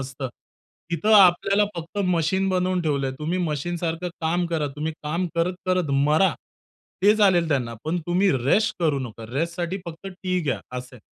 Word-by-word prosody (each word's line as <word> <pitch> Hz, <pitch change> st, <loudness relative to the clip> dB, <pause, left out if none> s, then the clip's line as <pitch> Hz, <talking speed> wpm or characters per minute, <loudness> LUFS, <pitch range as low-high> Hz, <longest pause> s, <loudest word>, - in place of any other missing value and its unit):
असतं. 135 Hz, 0 st, -5 dB, 0.6 s
इथं 170 Hz, +7 st, +1 dB
आपल्याला 195 Hz, +1 st, +5 dB
फक्त 170 Hz, +4 st, -6 dB
मशीन 180 Hz, +2 st, +1 dB
बनवून 185 Hz, -1 st, +1 dB
ठेवलंय. 140 Hz, -4 st, 0 dB
तुम्ही 165 Hz, +4 st, -2 dB
मशीन 175 Hz, 0 st, -2 dB
सारखं 165 Hz, +1 st, -2 dB
काम 175 Hz, +2 st, +1 dB
करा, 165 Hz, -3 st, -1 dB
तुम्ही 155 Hz, +2 st, -2 dB
काम 170 Hz, +4 st, -1 dB
करत-करत 180 Hz, -1 st, 0 dB, 0.2 s
मरा. 160 Hz, +6 st, +4 dB, 0.7 s
ते 205 Hz, +2 st, +6 dB
चालेल 185 Hz, -6 st, +4 dB
त्यांना 125 Hz, -6 st, 0 dB
पण 165 Hz, +3 st, -1 dB
तुम्ही 185 Hz, +3 st, +3 dB
रेस्ट 210 Hz, +10 st, +3 dB
करू 155 Hz, -4 st, +2 dB
नका. 115 Hz, -3 st, -7 dB
रेस्टसाठी 170 Hz, +5 st, -2 dB
फक्त 170 Hz, +3 st, -8 dB
टि 185 Hz, -1 st, -2 dB
घ्या 145 Hz, -6 st, -1 dB, 0.2 s
असं 125 Hz, +1 st, -10 dB
आहे. -, -, -17 dB
170 Hz, 160 wpm, -24 LUFS, 150-185 Hz, 0.7 s, ते